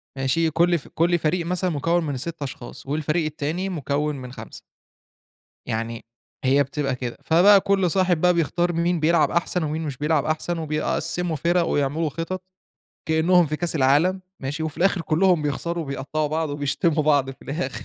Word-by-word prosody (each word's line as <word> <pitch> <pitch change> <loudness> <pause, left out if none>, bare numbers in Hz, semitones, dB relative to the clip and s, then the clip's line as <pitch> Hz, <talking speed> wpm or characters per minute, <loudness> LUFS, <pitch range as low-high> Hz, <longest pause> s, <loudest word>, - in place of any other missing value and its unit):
ماشي، 135 +5 +1
كلّ 170 +2 +3
ف 140 - -10
كلّ 170 +1 +1
فريق 165 +2 0
مثلًا 180 +1 0
مكوّن 165 +2 0
من 145 -4 -3
6 165 +4 -6
أشخاص، 130 -2 -7
والفريق 155 +3 -1
التاني 155 +5 -3
مكوّن 150 -3 -1
من 125 -2 -8
5. - - -10 1.0
يعني 115 +1 -4 0.4
هي 135 +2 +4
بتبقى 140 -1 -2
كده، 125 -2 -5
فبقى 190 +5 +6
كلّ 195 -3 +1
صاحب 180 -3 +2
بقى 180 0 +5
بيختار 175 +2 0
مين 170 0 +1
بيلعب 160 +1 +3
أحسن، 175 0 0
ومين 155 +1 -2
مش 145 -5 -4
بيلعب 150 0 +1
أحسن 160 +2 -1
وبيقسّموا 165 +2 -2
فِرَق 170 +4 +2
ويعملوا 150 +2 0
خطط، 165 +5 -4 0.6
كإنهم 165 +2 +4
في 155 +1 -2
كاس 170 0 -2
العالم، 155 +7 +3 0.2
ماشي، 145 +4 -4
وفي 155 -2 -4
الآخر 185 -1 +2
كلّهم 170 +2 +2
بيخسروا 165 +3 -2
وبيقطّعوا 140 +2 -2
بعض 160 0 -1
وبيشتموا 145 +2 0
بعض 145 -3 +3
في 135 - -11
الآخر. 135 -5 -4
160 Hz, 170 wpm, -23 LUFS, 145-175 Hz, 1.0 s, فبقى